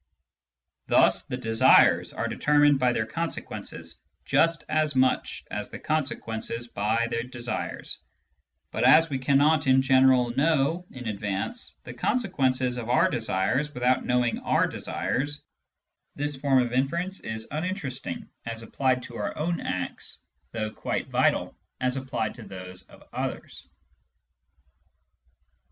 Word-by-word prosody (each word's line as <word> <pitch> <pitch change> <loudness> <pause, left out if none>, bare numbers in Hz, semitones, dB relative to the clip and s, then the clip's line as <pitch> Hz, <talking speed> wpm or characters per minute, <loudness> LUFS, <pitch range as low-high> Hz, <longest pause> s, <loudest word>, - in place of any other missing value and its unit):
Thus - - +4
the 125 - -4
desires 115 -3 +5
are - - -2
determined 145 -1 +3
by 125 -1 +3
their 110 -2 0
consequences 165 +8 -5 0.2
just 165 -1 +2
as 155 -2 +1
much 130 0 +1
as 105 0 -4
the - - -7
consequences 120 -6 -3
by 110 +2 0
the 115 - -1
desires; 120 -1 -4 0.7
but - - -2
as 165 -1 +6
we 135 - -1
cannot 145 +3 +3
(in 130 0 +5
general) 130 -2 +4
know 160 +4 +1
in 125 -2 -8
advance 105 - -3
the - - -8
consequences 130 - 0
of 120 -1 -5
our 125 - +4
desires 120 +5 0
without 125 +1 +2
knowing 125 -1 +1
our - - +2
desires, 145 +3 -3 0.7
this 145 0 -2
form 135 -1 +3
of 120 0 -4
inference 170 +9 -1
is 110 0 -5
uninteresting 150 - -4 0.2
as 115 0 -4
applied 130 +2 0
to 120 -1 -8
our 105 - -3
own 170 +2 -1
acts, 90 -1 -4 0.3
though 110 -1 -3
quite - - -3
vital - - +1 0.2
as 125 0 +1
applied 130 -5 -2
to - - -12
those 90 -1 -9
of - - -16
others. - - -5
130 Hz, 130 wpm, -26 LUFS, 115-145 Hz, 0.7 s, as